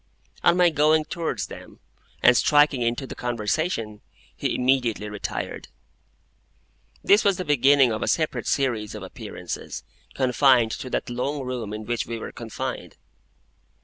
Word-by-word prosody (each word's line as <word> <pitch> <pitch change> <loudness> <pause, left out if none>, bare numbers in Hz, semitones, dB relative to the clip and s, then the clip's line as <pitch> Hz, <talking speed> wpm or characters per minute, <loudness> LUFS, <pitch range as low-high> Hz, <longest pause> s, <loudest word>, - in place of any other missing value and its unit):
On 175 +1 +4
my 175 -1 +5
going 155 +1 +3
towards 165 +1 -3
them, - - -12 0.4
and 125 - +7
striking 145 -1 +4
into 120 +3 -1
the - - -7
conversation, 115 - -2 0.3
he - - -2
immediately 125 -4 +1
retired. 105 -1 -5 1.4
This 205 +3 +5
was 200 -3 +3
the 185 - -4
beginning 140 -2 +4
of 110 0 -3
a - - -1
separate 155 -2 0
series 120 -7 0
of - - -7
appearances, - - -7 0.3
confined 125 -2 +4
to 130 - -5
that 120 - -3
long 135 +4 -2
room 125 -5 -4
in 105 0 -6
which 120 0 -2
we 115 0 -4
were - - -7
confined. - - -6
130 Hz, 145 wpm, -24 LUFS, 115-150 Hz, 1.4 s, and